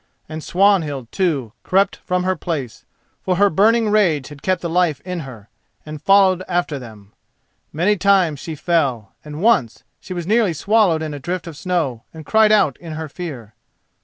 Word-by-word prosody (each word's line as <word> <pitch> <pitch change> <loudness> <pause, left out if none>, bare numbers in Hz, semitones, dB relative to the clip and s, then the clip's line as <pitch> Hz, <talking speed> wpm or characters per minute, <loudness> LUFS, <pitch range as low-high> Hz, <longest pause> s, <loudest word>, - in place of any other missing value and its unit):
And 155 0 -7
Swanhild, 165 - +1
too, 145 - -1
crept 195 +2 +1
from 180 0 -2
her 185 0 0
place, 150 -8 -5 0.4
for 185 - 0
her 200 +2 +3
burning 220 +5 +3
rage 170 -11 +2
had 145 -1 -12
kept 185 -1 -1
the - - -1
life 170 -3 +1
in 180 -1 -5
her, 125 -8 -10 0.4
and 155 -1 -8
followed 195 -2 +4
after 175 -5 -1
them. 110 -5 -13 0.6
Many 185 +7 +1
times 185 -6 +2
she 160 +2 -6
fell, 140 - -1
and 150 +3 -7
once 175 - +2 0.2
she 185 - -8
was 175 -2 -4
nearly 215 -2 +2
swallowed 190 -2 +2
in 155 -1 -4
a 145 - -6
drift 175 +5 -4
of 165 -3 -8
snow 155 -8 -2
and 160 -1 -10
cried 220 +3 +4
out 195 - +3
in 165 -2 -9
her 160 0 -5
fear. 135 - -8
170 Hz, 180 wpm, -19 LUFS, 145-190 Hz, 0.6 s, followed